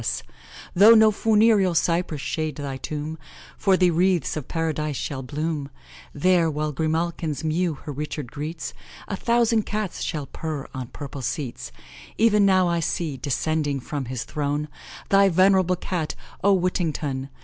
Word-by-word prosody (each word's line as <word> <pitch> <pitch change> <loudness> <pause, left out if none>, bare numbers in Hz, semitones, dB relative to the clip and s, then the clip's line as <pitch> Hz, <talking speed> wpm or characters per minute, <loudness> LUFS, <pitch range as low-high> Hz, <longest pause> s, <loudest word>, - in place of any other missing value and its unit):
S.' - - -2 0.5
Though 210 +5 +8
no 220 -1 +6
funereal 210 -4 +3
cypress 165 -3 0
shade 155 -1 -2
thy 140 -2 -5
tomb, 155 +3 -5 0.4
For 195 -2 +3
thee 180 -1 +4
the - - +1
wreaths 180 +1 +1
of 150 -5 -5
Paradise 155 -3 -2
shall 135 0 -4
bloom; 150 +2 -3 0.4
There, 175 0 +3
while 150 0 -2
Grimalkin's 160 0 -1
mew 160 +1 0
her 145 - -8
Richard 145 -2 -5
greets, 150 -1 -5 0.3
A 200 - -3
thousand 230 0 +2
Cats 210 -3 -3
shall 150 -4 -3
purr 155 -1 -5
on 130 -2 -5
purple 140 +1 -8
seats. 130 0 -4 0.5
E'en 210 -2 +5
now 185 -2 +4
I 170 0 +1
see, 160 -2 -2
descending 145 +1 -1
from 140 +1 -4
his 125 -1 -4
throne, 150 0 -2 0.4
Thy 195 0 +5
venerable 185 0 +4
Cat, 175 -3 -3 0.3
O 200 - +5
Whittington! 155 -7 -1
160 Hz, 150 wpm, -24 LUFS, 145-185 Hz, 0.5 s, Though